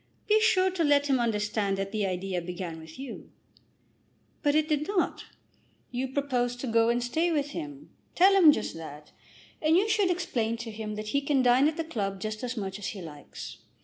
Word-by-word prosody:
Be 430 0 +4
sure 380 -4 +4
to 360 -2 0
let 290 -1 +4
him 270 -3 +2
understand 210 -3 0
that 195 0 -3
the 210 -2 0
idea 185 0 -2
began 175 -1 -6
with 160 0 -12
you." 265 -2 -8 1.1
"But 290 0 +2
it 310 0 +3
did 300 -1 0
not." 395 -4 -1 0.7
"You 255 +2 -2
proposed 255 -3 -1
to - - -3
go 230 0 +3
and 240 +1 +1
stay 320 +8 +1
with 290 -2 0
him. 295 -3 -7 0.2
Tell 380 +3 +6
him 360 -6 +8
just - - -2
that. 150 -2 -10 0.5
And 315 +2 +4
you 400 +3 +3
should 415 -3 +2
explain 245 -11 -1
to 230 -1 -6
him 215 0 -5
that 215 0 -5
he 280 +5 +1
can 280 -2 +2
dine 250 +3 +5
at 310 - -2
the 330 - -1
club 200 -11 -3
just 215 +3 -4
as 250 0 -3
much 195 -1 -4
as 200 - -4
he 200 - -5
likes. 150 -3 -9
245 Hz, 205 wpm, -28 LUFS, 210-305 Hz, 1.1 s, him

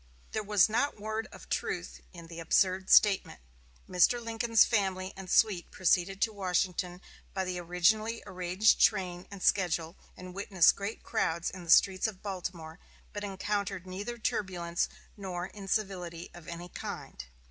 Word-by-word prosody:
There 220 - -1
was 210 -3 +4
not 240 +7 0
one 205 - -14
word 220 +1 -3
of - - -13
truth - - -3
in 170 -2 -11
the 165 0 -9
absurd 185 +3 +2
statement. 205 -3 +5 0.5
Mr. 185 +7 +4
Lincoln's 230 -1 +3
family 190 -3 -1
and 190 -1 -9
suite 195 -5 +3
proceeded 190 +1 +1
to 220 - 0
Washington 180 -2 -1 0.3
by 190 - 0
the 180 -1 -3
originally 210 +7 +1
arranged 185 +3 +2
train 180 -1 +2
and 200 -2 -9
schedule, 170 -3 +1 0.2
and 180 0 -9
witnessed 190 -2 +4
great 200 +3 -5
crowds 170 -6 -1
in 180 -2 -9
the - - -12
streets 190 +4 +5
of 200 -4 -8
Baltimore, 180 -4 -6 0.3
but 205 - -5
encountered 195 -1 -3
neither 200 +6 -5
turbulence 175 -6 -1 0.3
nor 185 -3 -4
incivility 190 -4 -4
of 175 -2 -13
any 170 +1 -7
kind. - - -7
185 Hz, 150 wpm, -30 LUFS, 175-205 Hz, 0.5 s, statement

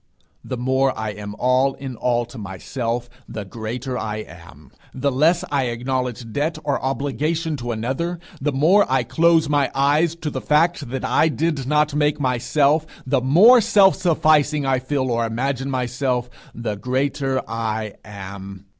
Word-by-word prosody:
The 130 - -5
more 130 +2 +1
I 110 0 -3
am 105 0 -8
all 130 +2 +2
in 135 -2 -7
all 120 +1 0
to 120 0 -11
myself, 115 +5 -4 0.2
the 105 -2 -6
greater 120 +5 -5
I 110 0 -4
am. 80 -4 -15 0.2
The 140 +2 0
less 160 +7 +3
I 140 -2 +1
acknowledge 125 -1 -3
debt 155 +3 -1
or 145 -2 -1
obligation 150 +4 -1
to 120 -2 -4
another; 130 +10 -2 0.2
the 150 +2 0
more 160 +7 +3
I 130 -2 +3
close 160 +5 +3
my 145 -2 +2
eyes 150 +4 +2
to 160 -3 -5
the 130 - -4
fact 155 -2 +1
that 130 +1 -3
I 160 - +3
did 155 -4 -1
not 150 0 +2
make 150 0 +1
myself; 145 +4 +1 0.2
the 130 0 +1
more 200 - +7
self 195 -2 +5
sufficing 155 -4 +2
I 135 -1 +2
feel 130 0 -1
or 115 0 +1
imagine 130 +4 -2
myself 125 -1 -1 0.2
the 115 -3 -3
greater 130 +3 -1
I 110 -2 -3
am. 100 -1 -9
130 Hz, 160 wpm, -21 LUFS, 120-150 Hz, 0.2 s, more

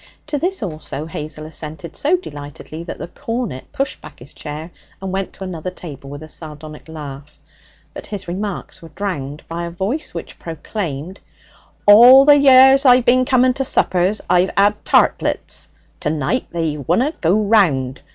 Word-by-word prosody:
To 300 -1 -2
this 365 - -1
also 155 -4 -5
Hazel 155 -1 -6
assented 155 0 -7
so 325 +6 +2
delightedly 150 - -9
that - - -6
the - - -6
cornet 225 - -5
pushed 275 0 -3
back - - -12
his 125 +3 -14
chair 155 +3 -7 0.3
and 190 -1 -5
went 195 0 -3
to - - -9
another 185 -2 -5
table 145 -7 -10
with 145 +2 -8
a - - -10
sardonic 155 -1 -10
laugh. 150 -2 -9 0.6
But - - -9
his 205 -4 -6
remarks 190 +1 -5
were 165 - -12
drowned 150 -5 -5
by 170 +1 -4
a - - -5
voice 195 - -3
which - - -8
proclaimed: 165 0 -5 0.7
'All 245 +6 +9
the 290 0 +7
years 265 0 +7
I've 250 -2 +5
bin 255 +1 +4 0.3
to 270 - -2
suppers 185 -4 +1
I've 180 +1 +3
'ad 205 +1 +3
tartlets! - - +1 0.3
To - - -1
night 155 - -1
they 165 -3 -2
wunna 180 - 0
go 180 +5 +3
round. 165 - +2
175 Hz, 160 wpm, -19 LUFS, 155-225 Hz, 0.7 s, All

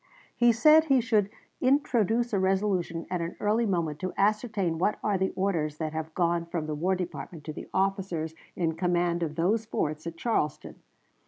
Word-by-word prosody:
He 240 0 +5
said 305 +7 +6
he 270 -4 +4
should 220 -4 +2 0.3
"introduce 240 -4 +2
a 200 - +2
resolution 190 -3 0
at 180 -2 -1
an 170 +1 -4
early 220 +2 +1
moment 165 -6 -1
to 185 -1 -4
ascertain 205 -4 +1
what 205 +4 +1
are 210 - +1
the 190 0 0
orders 165 -6 -1
that 155 -1 -3
have 160 0 -5
gone 170 -1 +1
from 170 -2 -3
the 155 - -3
War 180 +6 0
Department 170 -3 -6
to 155 - -6
the - - -8
officers 190 -5 -1 0.2
in 165 -2 0
command 175 0 0
of 155 -2 -2
those 205 +7 +1
forts" 155 -5 -2
at 165 0 -6
Charleston. 165 - -2
185 Hz, 180 wpm, -28 LUFS, 165-210 Hz, 0.3 s, said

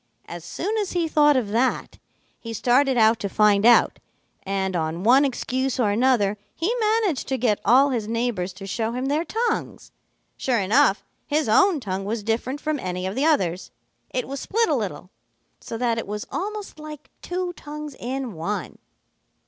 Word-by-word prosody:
As 170 -1 -8
soon 380 - -3
as 405 -3 -3
he 345 -2 0
thought 295 -2 +4
of 230 -5 -1
that, 240 +5 -1 0.4
he 230 -1 -7
started 255 +4 +2
out 220 0 +4
to 200 - -3
find 210 +1 +4
out, 240 - +5 0.4
and 190 -1 -2
on 165 +1 -2
one 255 +6 +6
excuse 260 -1 -1
or 215 -4 +2
another 210 -3 +2 0.2
he 355 +9 0
managed 430 - +1
to 265 - -1
get 220 -4 +1
all 270 +4 +5
his 225 -4 -2
neighbors 230 -5 -1
to 195 +1 -10
show 225 +3 -2
him 250 +2 -3
their 295 +4 0
tongues. 455 +5 -3 0.5
Sure 255 -3 0
enough, 215 +2 +3 0.2
his 300 -1 0
own 340 - +4
tongue 195 -5 -4
was 215 +1 -3
different 235 +6 -2
from 310 -1 -2
any 180 -2 -4
of 190 - -2
the 270 +6 0
others. 185 - +1 0.4
It 250 - -3
was 275 +1 -5
split 455 - 0
a - - +2
little, - - -4 0.5
so 225 - -6
that 230 -1 0
it - - -6
was 210 +1 -4
almost 415 -2 -5
like 300 -1 -10
two 360 0 -3
tongues 300 -3 -8
in 255 -1 -4
one. 175 +6 -4
245 Hz, 180 wpm, -23 LUFS, 210-295 Hz, 0.5 s, one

